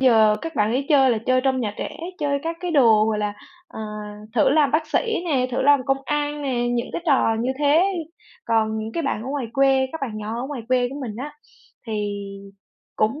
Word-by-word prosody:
giờ 220 -5 +5
các 330 0 -5
bạn 210 +1 +2
ấy 270 +3 -1
chơi 270 -4 +5
là 230 - +1
chơi 255 0 +3
trong 265 -1 +1
nhà 210 -3 -2
trẻ, - - -5 0.2
chơi 285 -2 0
các 330 +1 -3
cái 360 -1 -3
đồ, 230 -8 +5
gọi 215 -1 0
là, 210 -1 -1 0.4
ờ, 325 - -9 0.5
thử 230 - +4
làm 290 -1 +4
bác 310 +2 +1
sĩ 450 -7 0
nè, 270 -7 +1
thử 250 - -1
làm 285 0 +5
công 270 0 +2
an 295 0 -2
nè, 245 -3 0
những 240 0 -1
cái 340 - -4
trò 255 -6 +3
như 255 +3 0
thế. 300 +4 +4 0.6
Còn 220 -1 +1
những 220 +1 -5
cái 335 - -2
bạn 275 -6 -2
ở 255 - -6
ngoài 275 -3 -2
quê, 270 0 +3
các 320 - -6
bạn 275 -3 -2
nhỏ 220 +2 -4
ở 255 - -3
ngoài 275 -4 -6
quê 250 -1 +2
của 270 - -8
mình 225 -6 -5
á, 285 +5 -6 0.5
thì 210 -2 -2 0.8
cũng 220 +8 +1
260 Hz, 225 wpm, -23 LUFS, 225-290 Hz, 0.8 s, giờ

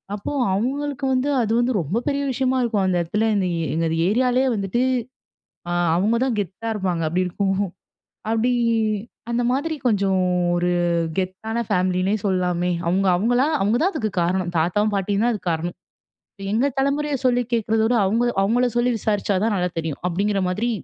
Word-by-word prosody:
அப்போ 205 - -5 0.2
அவுங்களுக்கு 275 +6 -2
வந்து, 260 +2 +1
அது 220 -2 -1
வந்து 245 +1 +1
ரொம்ப 165 +7 -2
பெரிய 280 -1 0
விஷயமா 260 0 0
இருக்கும். 215 -5 0
அந்த 180 -1 +1
இடத்துல 210 +7 0
இந்த 190 -2 +1 0.3
எங்க 165 +1 0 0.2
ஏரியாலியே 250 +4 +2
வந்துட்டு 200 +5 0 0.9
ஆ - - -1 0.2
அவங்க 210 +6 +2
தான் 255 -4 -1
கெத்தா 200 +3 -4
இருப்பாங்க. 185 -5 -1
அப்படி 180 +3 0
இருக்கும். 195 +1 -1 0.7
அப்டி 225 +2 +2 0.8
அந்த 235 +1 0
மாரி 295 +5 -1
கொஞ்சம் 195 -4 +2 0.3
ஒரு 175 0 +1 0.5
கெத்தான 190 +5 -3
ஃபேமிலின்னே 185 0 +1
சொல்லாமே. 180 -2 0 0.2
அவுங்க 190 +3 +1
அவுங்கள 240 +7 +2 0.2
அவுங்க 205 +4 +2
தான் 380 +4 +2
அதுக்கு 220 -9 -2
காரணம் 175 +1 0
தாத்தாவும், 205 +6 +1
பாட்டியும் 200 +1 0
தான் 240 - +2
அதுக்கு 190 -5 -3
காரணம். 165 +2 -3 0.8
எங்க 240 +6 +2
தலமுறைய 280 +2 0
சொல்லி 245 -1 +3
கேட்குறத 225 -1 +1
விட, 240 +2 +2
அவுங்க 225 +5 +1 0.2
அவுங்கள 240 +5 +2
சொல்லி 240 +1 +2
விசாரிச்சா 205 -1 0
தான் 225 -1 +1
நல்லா 180 -1 0
தெரியும். 160 -3 -4
அப்படிங்கிற 195 +3 0
மாதிரி 220 +6 -1
210 Hz, 160 wpm, -22 LUFS, 185-245 Hz, 0.9 s, சொல்லி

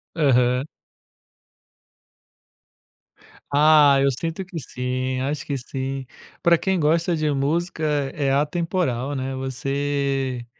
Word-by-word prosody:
Aham. 125 -3 +3 2.9
Ah, 145 -2 +6
eu 140 - +4
sinto 165 +8 -4
que 180 -3 -7
sim, 130 0 -3
acho 140 +1 -3
que 140 - -2
sim. 135 +1 -5 0.4
Pra 170 -1 +5
quem 190 0 0
gosta 165 +3 +2
de 155 -1 0
música 155 +4 -1 0.3
é 140 -2 0
atemporal, 145 -3 0
né, 130 0 -3
você 135 -1 -2
140 Hz, 100 wpm, -23 LUFS, 130-155 Hz, 2.9 s, Ah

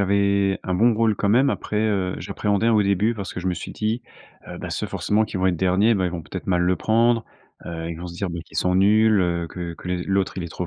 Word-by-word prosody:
avait 100 0 +2
un 90 - -1
bon 115 +4 +4
rôle 110 -1 +2
quand 100 - -1
même. 130 +6 +4
Après, 105 - -3
heu, 100 -4 0
j'appréhendais 105 +2 0
au 110 -2 +4
début, 100 +4 +1
parce 100 -3 -6
que - - -6
je 95 - -5
me 90 - +1
suis - - -7
dit: 110 +3 -2 0.5
«Heu, - - -7
bah, - - -6
ceux - - -2
forcément 110 +1 0
qui 100 - -6
vont 95 0 +1
être 90 -2 +1
derniers, 95 +6 +3
bah, 95 -3 0
ils - - -2
vont 85 -2 -5
peut - - -9
être - - -6
mal 90 -1 +2
le 90 +1 +2
prendre. 115 +1 +2 0.4
Heu, 85 -1 -5
ils - - -4
vont 90 - -6
se 85 - -9
dire, 95 0 -3
beh, 85 -1 -5
qu'ils - - -12
sont 90 0 +1
nuls, 105 +2 +4
heu, 85 -1 0
que 85 -1 -6
que 90 - -10
les 90 -1 -1
l'autre, 95 -1 0
il - - -3
est 85 - -5
trop 90 +2 -5
95 Hz, 280 wpm, -23 LUFS, 90-110 Hz, 0.5 s, bon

